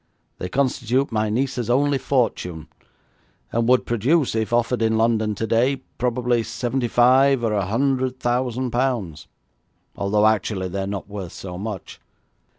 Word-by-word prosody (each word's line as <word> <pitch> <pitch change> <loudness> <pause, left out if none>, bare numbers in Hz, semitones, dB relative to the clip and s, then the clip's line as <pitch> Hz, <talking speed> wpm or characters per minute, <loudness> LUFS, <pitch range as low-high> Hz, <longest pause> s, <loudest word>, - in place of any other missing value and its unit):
They 90 - -4
constitute 130 +1 0
my 110 -1 0
niece's 125 0 -1
only 140 +2 +2
fortune, 90 - -1 0.8
and 115 +1 0
would 125 0 +4
produce, 130 +6 +1
if 110 0 -1
offered 120 0 +1
in 110 0 +2
London 110 -2 +1
today, 115 +6 +1 0.2
probably 125 -1 +1
seventy 120 +2 -2
five 130 +2 +4
or 110 -2 +1
a 100 -3 0
hundred 130 +3 0
thousand 125 0 -1
pounds, 115 - -2 0.7
although 105 +2 +1
actually 100 -3 +1
they 100 +2 -3
are 95 - -3
not 100 -1 -5
worth 100 -4 -7
so 90 -2 -7
much. 105 -2 -7
115 Hz, 145 wpm, -22 LUFS, 105-130 Hz, 0.8 s, would